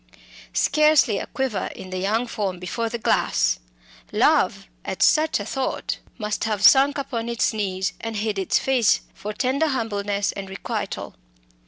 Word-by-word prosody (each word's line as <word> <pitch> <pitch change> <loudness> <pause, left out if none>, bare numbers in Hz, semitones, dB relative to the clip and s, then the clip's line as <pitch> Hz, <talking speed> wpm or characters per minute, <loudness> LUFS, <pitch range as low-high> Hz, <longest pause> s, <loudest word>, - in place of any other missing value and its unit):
Scarcely 300 -8 +4
a - - -5
quiver 260 -8 -2
in 185 - -9
the 185 - -3
young 215 +6 0
form 200 -6 -3
before 225 +6 -3
the 235 - -3
glass! 225 - +1 0.5
Love, - - +2 0.2
at - - -1
such 310 -4 +3
a 205 - -5
thought, 265 +4 -3 0.2
must 210 -1 -2
have 210 -2 -1
sunk 280 +1 +6
upon 235 -4 -3
its 235 -1 +1
knees 190 -4 -2
and 225 -1 -4
hid 210 -1 -1
its 190 - +2
face 255 -5 +2
for 210 - -6
tender 265 +8 0
humbleness 205 -6 -1
and 195 -1 -7
requital. 195 - -4
220 Hz, 155 wpm, -23 LUFS, 200-260 Hz, 0.5 s, sunk